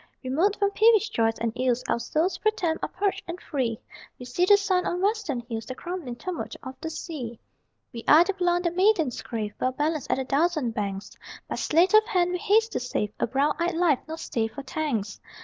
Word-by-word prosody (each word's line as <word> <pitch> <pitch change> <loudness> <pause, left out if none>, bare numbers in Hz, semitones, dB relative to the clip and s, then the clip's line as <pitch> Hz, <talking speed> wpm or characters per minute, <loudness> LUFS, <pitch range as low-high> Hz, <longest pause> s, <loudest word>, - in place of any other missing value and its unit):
Remote 325 +11 +1
from 400 -1 +1
peevish 440 0 +4
joys 225 0 +1
and 230 -1 -2
ills 250 -1 0
Our - - +1
souls, 340 +9 0
pro 430 - +3
tem, 345 -7 -1
are - - -2
purged 395 +1 -1
and 345 +1 -5
free: 250 -9 -2 0.4
We 250 - -9
see 250 +9 +1
the 405 +2 +7
sun 380 -3 +1
on 355 - -1
western 395 - 0
hills, 230 -2 -6
The 255 - -5
crumbling 340 -6 -5
tumult 360 +7 -5
of 260 -1 -6
the 320 - -3
sea. 265 -9 -6 0.5
We 230 -1 -7
are 315 +3 +8
the 395 - -2
blond 355 -2 +1
that 340 0 0
maidens 365 - +2
crave, 215 -3 -4
Well 255 0 +1
balanced 300 +1 -1
at - - +2
a 265 - -1
dozen 300 -2 +1
banks; 200 -3 -4 0.4
By - - -4
sleight 340 +6 +2
of 430 0 +8
hand 360 -5 +2
we 360 - -2
haste 440 +2 +3
to - - -1
save 210 -4 -2
A - - +1
brown 275 +5 +1
eyed 340 0 0
life, 330 -6 +3
nor 320 +1 -5
stay 230 -8 -2
for 225 +5 -9
thanks! 260 -8 -3
315 Hz, 220 wpm, -26 LUFS, 245-365 Hz, 0.5 s, are